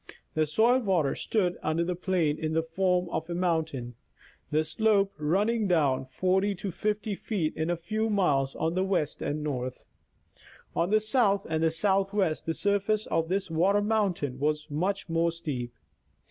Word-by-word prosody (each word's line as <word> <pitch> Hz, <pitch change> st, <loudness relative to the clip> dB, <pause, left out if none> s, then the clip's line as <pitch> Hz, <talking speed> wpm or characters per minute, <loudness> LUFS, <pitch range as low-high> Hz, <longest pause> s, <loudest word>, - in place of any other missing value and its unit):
The 155 Hz, -1 st, +1 dB
soil 230 Hz, -, +4 dB
water 180 Hz, -, +1 dB
stood 180 Hz, -5 st, -1 dB
under 160 Hz, +2 st, 0 dB
the 180 Hz, +1 st, -1 dB
plain 175 Hz, -4 st, 0 dB
in 155 Hz, -1 st, -2 dB
the 160 Hz, 0 st, +1 dB
form 180 Hz, +2 st, +1 dB
of 160 Hz, 0 st, -3 dB
a 170 Hz, -, -2 dB
moun 170 Hz, -3 st, +1 dB
tain, 125 Hz, -6 st, -7 dB, 0.6 s
the 155 Hz, +1 st, +2 dB
slope 200 Hz, +2 st, +2 dB
running 205 Hz, +8 st, +1 dB
down 140 Hz, -7 st, +2 dB
40 190 Hz, +8 st, +1 dB
to 195 Hz, +1 st, -5 dB
50 210 Hz, +3 st, -2 dB
feet 190 Hz, -5 st, -2 dB
in 160 Hz, +1 st, -2 dB
a 175 Hz, -, 0 dB
few 215 Hz, +7 st, -2 dB
miles 145 Hz, -10 st, +1 dB
on 160 Hz, +1 st, -1 dB
the 185 Hz, +1 st, +1 dB
west 185 Hz, -6 st, -1 dB
and 150 Hz, +1 st, -2 dB
north. 130 Hz, -4 st, -4 dB, 0.9 s
On 170 Hz, +2 st, +1 dB
the 215 Hz, +1 st, +4 dB
south 215 Hz, -3 st, +2 dB
and 160 Hz, 0 st, +1 dB
southwest 195 Hz, -1 st, +1 dB
the 165 Hz, -, 0 dB
surface 205 Hz, +1 st, +1 dB
of 165 Hz, 0 st, -1 dB
this 190 Hz, -2 st, -1 dB
water 185 Hz, +6 st, +3 dB
mountain 190 Hz, -, 0 dB
was 150 Hz, +1 st, -1 dB
much 185 Hz, +7 st, -1 dB
more 165 Hz, 0 st, +1 dB
steep. 140 Hz, -8 st, -4 dB
175 Hz, 170 wpm, -28 LUFS, 155-200 Hz, 0.9 s, soil